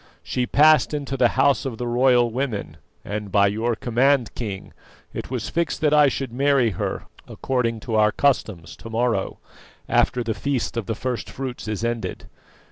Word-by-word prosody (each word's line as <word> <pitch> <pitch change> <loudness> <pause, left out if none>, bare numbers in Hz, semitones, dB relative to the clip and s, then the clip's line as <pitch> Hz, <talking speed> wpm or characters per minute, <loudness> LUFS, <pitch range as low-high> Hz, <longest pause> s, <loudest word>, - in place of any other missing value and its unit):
She 125 -1 -2
passed 150 0 +4
into 140 -2 -4
the 125 -2 +4
House 135 -2 +3
of 130 -4 -4
the 125 - -4
Royal 120 0 +3
Women, 125 -4 -3 0.3
and, 105 -1 -5
by 100 0 +4
your 110 +4 0
command, 125 +2 +1
King, 100 -5 -6 0.4
it - - -6
was - - -3
fixed 170 -1 -1
that 150 -1 +3
I 150 -1 +6
should 135 -3 -3
marry 135 -3 +2
her 90 - -3 0.2
according 115 -4 -2
to 115 0 -5
our 105 -1 +4
customs 105 - 0
to 115 - -10
morrow, 115 -3 -1 0.5
after 125 - +2
the 115 -1 -2
feast 135 +1 -2
of 115 -4 -3
the 115 - -2
first 125 0 -4
fruits 130 -3 -6
is 110 +1 -3
ended. 115 -1 -3
120 Hz, 175 wpm, -23 LUFS, 110-135 Hz, 0.5 s, I